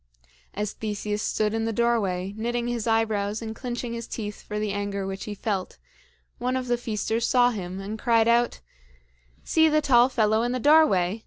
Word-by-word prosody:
As 210 0 -2
Theseus 210 -1 -3
stood 215 0 0
in 225 0 -1
the 225 - -1
doorway, 205 -5 0
knitting 240 +2 -2
his 240 -2 -2
eyebrows 220 -2 +1
and 220 -1 -6
clinching 240 -1 -4
his 235 -1 -5
teeth 210 -2 -6
for 210 - -6
the 210 -1 -1
anger 200 -1 -3
which 195 0 -5
he 210 - -5
felt, 200 -2 -3 0.6
one 250 +2 -1
of 255 - -3
the 240 - +2
feasters 230 -1 -2
saw 245 -1 +4
him, 190 -4 -5
and 205 +3 -6
cried 230 -1 +3
out: 235 - +2 0.8
"See 320 -1 +4
the 305 0 +3
tall 250 -4 +4
fellow 220 -3 +2
in 240 +1 -1
the 255 - -1
doorway! 230 - +4
225 Hz, 185 wpm, -25 LUFS, 205-240 Hz, 0.8 s, saw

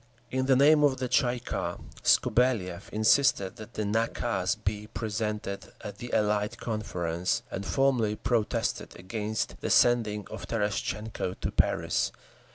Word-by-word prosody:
In 130 0 0
the 135 - +5
name 150 +3 +6
of 140 -3 +3
the 130 0 -2
Tsay 120 0 +2
ee - - -6
kah, 120 - -3 0.2
Skobeliev 100 -8 +2
insisted 110 -2 +3
that 110 +1 -11
the 110 - -1
nakaz 105 -2 0
be 105 0 -3
presented 105 -3 -4
at 105 -2 -8
the 120 0 -7
Allied 105 +2 +1
Conference, 90 -6 -2
and 95 - -4
formally 130 -6 +2
protested 115 -1 -1
against 105 +4 -3
the - - -2
sending 110 -4 +3
of - - -7
Terestchenko 105 -2 -2
to - - -2
Paris. - - +1
110 Hz, 140 wpm, -28 LUFS, 105-120 Hz, 0.2 s, name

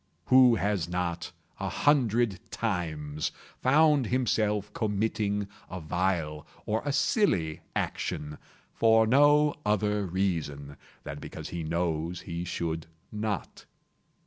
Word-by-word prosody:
Who 130 -2 +8
has 100 -5 -1
not, 90 -1 -2 0.3
a - - -2
hundred 120 -8 +2
times, 80 -10 -2 0.3
found 145 -1 +4
himself 105 -4 0
committing 105 -1 -1 0.2
a 95 - -5
vile 80 -2 -1 0.2
or 110 +1 0
a 145 - -1
silly 140 - +1
action, 75 0 -3 0.3
for 110 -1 +5
no 145 +4 +5
other 105 -2 +1
reason 80 -6 -2 0.3
than - - -6
because - - -8
he 85 - -4
knows 85 +1 -2
he 85 0 -5
should 80 -2 -3 0.2
not? 105 -4 -4
100 Hz, 110 wpm, -28 LUFS, 85-115 Hz, 0.3 s, Who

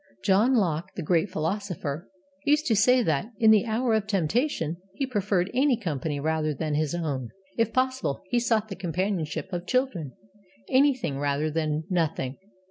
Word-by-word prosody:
John 215 +7 +4
Locke, 175 -4 0
the 175 - -4
great 170 +4 +2
philosopher, 170 -2 -3 0.3
used 300 +2 +3
to 230 - +2
say 250 +5 +5
that, 155 0 0
in 220 0 +6
the 215 +2 +4
hour 230 +2 +1
of 215 -1 +1
temptation, 195 - 0 0.2
he 275 - -1
preferred 205 -6 0
any 260 0 +3
company 150 - -3
rather 155 0 0
than 155 +2 -2
his 155 +1 0
own. 140 -8 -3 0.3
If 225 -1 +1
possible, 255 - 0
he 245 - +3
sought 225 -2 +1
the 195 - -5
companionship 180 0 -2
of 175 0 -4
children. 200 - 0 0.5
Anything 260 - +2
rather 145 +2 0
than 155 -1 -1
Nothing. 160 -7 -1
185 Hz, 160 wpm, -26 LUFS, 155-230 Hz, 0.5 s, in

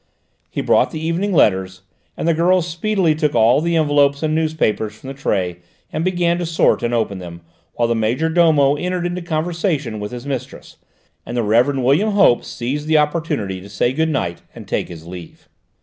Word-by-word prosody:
He - - -3
brought - - +3
the 155 - -6
evening 165 +6 -1
letters, 95 - +2 0.3
and - - -2
the 170 - +4
girls 175 +2 +2
speedily 175 0 +1
took 150 -1 -1
all 115 +6 +4
the 170 +1 0
envelopes 145 -2 +2
and 155 0 0
newspapers 155 -9 0
from 130 +4 -11
the - - -5
tray 95 -10 -2 0.4
and 155 - -1
began 175 -1 +1
to 175 - -2
sort 165 0 +2
and 120 - -1
open 110 -5 -1
them, 85 -1 -9 0.3
while 120 - +1
the 115 - +1
major 115 +8 0
domo 160 -4 +4
entered 180 +1 -2
into 175 +1 -3
conversation 160 - -2
with 105 0 -5
his 125 +1 -7
mistress, 130 -3 -6 0.5
and 120 - -6
the 120 - +1
Rev. 120 +6 +2
William 145 - +2
Hope 195 -12 +4
seized 140 +5 -4
the 155 0 +4
opportunity 150 - -1
to 100 - -12
say 110 +5 0
good 160 +3 0
night, 90 - -2
and - - -10
take - - -2
his 80 -2 -10
leave. 85 -1 -11
145 Hz, 195 wpm, -19 LUFS, 115-165 Hz, 0.5 s, the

